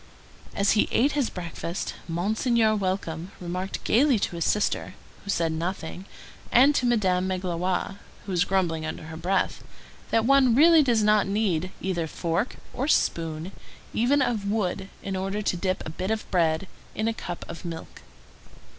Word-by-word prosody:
As 200 0 +3
he 215 - +3
ate 275 +5 +3
his 285 -5 0
breakfast, 170 0 -5
Monseigneur 215 +6 +1
Welcome 185 -3 -2
remarked 180 +2 -4
gayly 260 +2 +4
to 195 -3 -2
his 170 - -1
sister, 210 - 0 0.3
who 200 - -10
said 170 -4 +1
nothing, 170 +2 -4 0.5
and 270 +5 +6
to 255 -3 +1
Madame 190 -6 +2
Magloire, 185 +1 -2 0.3
who 200 - -5
was 180 -1 +3
grumbling 175 -4 0
under 155 - -5
her 160 +1 -8
breath, 180 +4 -1 0.5
that 225 -1 +2
one 265 -2 +5
really 325 +3 +7
does 235 -6 +2
not 210 -1 +4
need 190 -4 0
either 175 -3 -1
fork 170 +8 -2 0.2
or 265 +3 -2
spoon, 165 - 0 0.4
even 270 +5 +3
of 220 -5 -1
wood, 195 -2 -1
in 195 - -3
order 195 +3 -2
to 185 - 0
dip 185 +1 -2
a 155 - -5
bit 185 +4 -4
of 220 0 -2
bread 165 0 +2 0.3
in 215 - -1
a 225 - +1
cup 175 -5 -6
of - - -8
milk. 165 -2 -7
190 Hz, 165 wpm, -26 LUFS, 175-220 Hz, 0.5 s, really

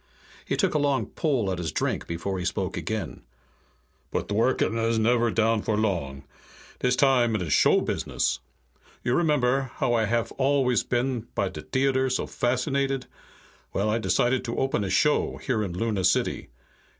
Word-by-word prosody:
He - - -1
took - - +1
a 150 - +2
long 140 -2 +1
pull 130 -11 -1
at 90 - -3
his 80 -3 -3
drink - - -2
before 90 +3 -3
he - - -3
spoke 95 0 -2
again. 110 -7 -4 0.9
"But - - -2
Dworken 115 +2 +1
is 115 0 +1
never 120 +1 +3
down 115 0 +2
for 105 0 -1
long. 85 -11 -1 0.6
Dis 125 0 +2
time 125 -4 +3
it 100 - -1
is 80 - -1
show - - +4
business. - - -1 0.6
You 120 - +1
remember, 135 -5 +2
how 120 - 0
I 115 -2 +2
haf 115 +1 0
always 135 -2 +2
been 120 -1 -1
by - - 0
de - - -8
t'eater 130 0 +1
so 130 - 0
fascinated? 135 +2 -1 0.7
Well, 105 +2 0
I 115 - +1
decided 125 +3 +1
to 115 - -4
open 135 -6 0
a 95 - -3
show 150 +11 +2
here 125 -6 -1
in 95 -4 -3
Luna 105 -3 -1
City. 90 - +1
120 Hz, 170 wpm, -26 LUFS, 105-130 Hz, 0.9 s, show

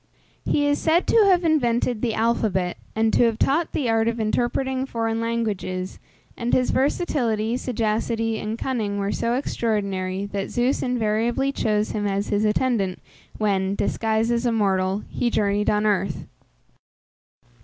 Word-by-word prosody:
He 290 - +1
is 290 0 +2
said 335 +2 +3
to 445 -3 +5
have 360 -2 +4
invented 245 -7 +1
the 230 -3 0
alphabet, 215 -5 0 0.2
and 220 0 +2
to 240 - +5
have 225 -2 +1
taught 310 +7 +1
the 275 - -1
art 225 0 +2
of 230 0 -1
interpreting 260 +4 0
foreign 225 -2 -2
languages, 210 -5 -3 0.4
and 240 0 -3
his 255 - +2
versatility, 245 -6 0
sagacity, 225 -2 -1
and 215 +1 -4
cunning 220 -6 -2
were 200 0 -1
so 235 +1 0
extraordinary, 200 -7 -2
that 200 -1 -4
Zeus 245 +2 0
invariably 240 +2 0
chose 215 -5 0
him 205 -1 -1
as 200 0 -1
his 205 +1 +1
attendant, 210 -4 +1 0.4
when, 195 -2 0
disguised 220 +2 0
as 235 +1 +1
a - - +2
mortal, 195 -2 +1
he 240 - -1
journeyed 205 -2 +1
on 210 0 +1
earth. 195 -5 0
225 Hz, 150 wpm, -23 LUFS, 205-245 Hz, 0.4 s, to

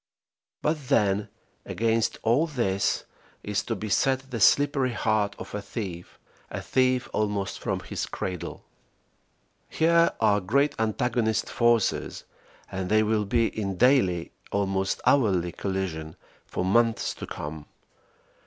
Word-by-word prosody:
But 150 -3 -1
then, 105 -6 +2 0.3
against 115 0 0
all 125 +9 +3
this, 115 -10 0 0.4
is 105 -1 -1
to 115 - -2
be 110 +2 -5
set 130 +6 +1
the 115 - -3
slippery 135 +2 +4
heart 110 -3 0
of - - -9
a 105 - -3
thief, 95 -4 -7 0.3
a - - -4
thief 130 -1 +1
almost 105 -2 -1
from - - -2
his - - -4
cradle. 90 -3 -5 1.0
Here 170 +1 +4
are 105 0 +3
great 140 +10 +2
antagonist 110 0 0
forces 120 -3 +1 0.5
and 95 -1 -3
they 110 0 +4
will 105 -1 +1
be 115 +2 +2
in 100 -4 -3
daily 115 -9 +3 0.2
almost 95 -1 0
hourly 95 -10 +3
collision 90 -6 -4 0.3
for 90 - -2
months 115 +4 +2
to - - -8
come. 75 0 -7
110 Hz, 125 wpm, -26 LUFS, 95-125 Hz, 1.0 s, slippery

